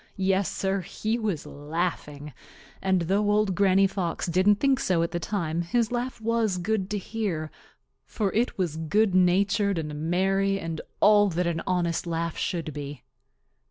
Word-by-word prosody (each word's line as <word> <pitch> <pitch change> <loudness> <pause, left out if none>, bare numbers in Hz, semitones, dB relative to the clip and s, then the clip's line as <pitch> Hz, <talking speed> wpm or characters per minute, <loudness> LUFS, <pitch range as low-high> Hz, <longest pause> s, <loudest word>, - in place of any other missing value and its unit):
Yes, 195 0 +1
Sir, 195 0 -1
he 220 +6 -3
was 205 -9 -2
laughing, 150 -1 -4 0.5
and 190 -2 +2
though 200 +4 +1
Old 210 -2 +2
Granny 195 0 +4
Fox 185 -3 -2
didn't 185 +4 +3
think 270 +4 +2
so 175 -7 +1
at 170 - -2
the 175 - -2
time, 170 -4 -2
his 225 +6 0
laugh 245 0 -3
was 225 -3 0
good 195 +1 -1
to 210 - -1
hear, 190 -7 -3 0.5
for 205 -4 -2
it 235 +3 0
was 170 -5 -1
good 195 +6 +1
natured 195 +2 +3
and 150 -2 -3 0.2
merry 195 +2 +1
and 165 -2 -4 0.2
all 205 -1 +6
that 175 0 -1
an 170 -1 -1
honest 175 -2 0
laugh 165 0 -2
should 165 -4 -3
be. 145 -3 -7
190 Hz, 160 wpm, -26 LUFS, 170-205 Hz, 0.5 s, all